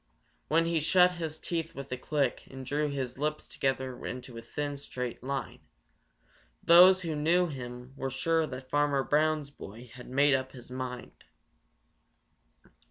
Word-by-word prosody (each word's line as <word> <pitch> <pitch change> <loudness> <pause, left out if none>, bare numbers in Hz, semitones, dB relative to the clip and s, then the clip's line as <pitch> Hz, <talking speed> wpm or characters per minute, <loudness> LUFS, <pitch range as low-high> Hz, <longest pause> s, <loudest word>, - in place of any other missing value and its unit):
When 165 +3 +3
he 165 -1 +1
shut 180 +4 +5
his 160 -1 -3
teeth 165 0 -3
with 140 -1 -8
a - - 0
click 140 0 -1
and 130 0 -8
drew 150 +3 0
his 135 -2 -4
lips 150 +1 -2
together 130 -2 -2
into 125 -1 -6
a 115 - -6
thin, 145 +4 -4
straight 125 -3 -5
line, 135 +2 -4 1.0
those 185 +2 +8
who 165 -3 -3
knew 165 +4 +3
him 125 -4 -7
were 135 -1 -3
sure 160 +5 +1
that 130 -1 -8
Farmer 145 -2 +2
Brown's 150 -1 +1
boy 115 -2 -11
had 125 0 -11
made 140 +2 +4
up 130 0 -1
his 125 -1 -12
mind. 125 -1 -6
140 Hz, 155 wpm, -30 LUFS, 130-155 Hz, 1.0 s, those